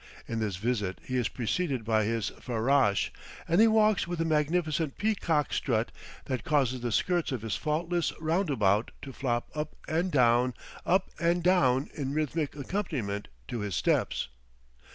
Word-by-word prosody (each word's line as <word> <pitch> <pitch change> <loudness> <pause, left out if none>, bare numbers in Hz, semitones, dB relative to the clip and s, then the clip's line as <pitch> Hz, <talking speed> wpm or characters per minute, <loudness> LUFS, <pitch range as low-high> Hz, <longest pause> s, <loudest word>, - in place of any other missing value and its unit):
In 115 - -2
this 105 -4 -1
visit 105 -2 -1
he 130 - -3
is 125 -3 +2
preceded 130 0 -1
by 110 -1 +2
his 115 -1 -1
farrash, 120 -3 +2 0.4
and 170 +5 +4
he 225 - +7
walks 215 -4 +3
with 175 -1 -3
a 165 - +1
magnificent 155 -1 0
peacock 175 -8 +1
strut 115 -3 0 0.3
that 130 -4 -2
causes 130 -4 +1
the 120 -1 -2
skirts 175 +7 +1
of 125 -5 -3
his 110 -2 -1
faultless 165 +3 0
roundabout 140 - +1
to 135 - -7
flop 120 -3 -2
up 150 0 -4
and 170 +4 0
down, 125 -2 +3 0.3
up 190 +2 +2
and 170 +1 +2
down, 140 -7 +3
in 140 -2 -3
rhythmic 155 -1 -1
accompaniment 135 - -3 0.2
to 120 - -4
his 105 -4 -3
steps. 60 - +1
140 Hz, 155 wpm, -29 LUFS, 115-165 Hz, 0.4 s, he